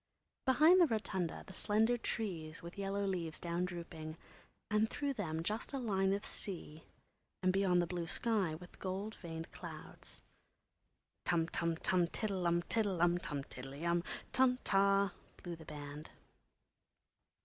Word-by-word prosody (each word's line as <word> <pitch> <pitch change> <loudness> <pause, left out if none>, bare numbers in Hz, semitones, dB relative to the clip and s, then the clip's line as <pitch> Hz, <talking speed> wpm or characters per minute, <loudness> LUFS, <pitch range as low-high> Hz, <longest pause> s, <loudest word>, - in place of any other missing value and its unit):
Behind 315 +8 +7
the 340 - +7
rotunda 200 - -1
the 190 - -10
slender 220 +5 +3
trees 170 -10 -3
with 170 +1 -8
yellow 200 0 -1
leaves 170 -5 -2
down 170 +1 -1
drooping, 165 -3 -6 0.5
and 215 +1 +3
through 285 -1 -1
them 165 -9 -2
just 215 - -2
a - - 0
line 195 -6 +2
of 200 +1 0
sea, 160 -5 -3 0.6
and 185 0 +4
beyond 185 -2 +4
the - - 0
blue 170 -1 -3
sky 200 -6 +1
with 175 +2 -12
gold 195 +3 -3
veined 165 -4 -7
clouds. - - -9 1.0
Tum 165 -2 +2
tum 170 -1 0
tum 180 0 +2
tiddle 190 -2 -1
um! 170 0 +2
tiddle 205 -3 +1
um! 175 +1 +4
tum 145 -5 -3
tiddley 135 +4 -7
um 170 0 +2 0.3
tum 255 -1 +5
ta! 195 -1 +4 0.2
blew 175 -1 -6
the 160 -1 -12
band. 145 +1 -7
180 Hz, 150 wpm, -36 LUFS, 165-210 Hz, 1.0 s, Behind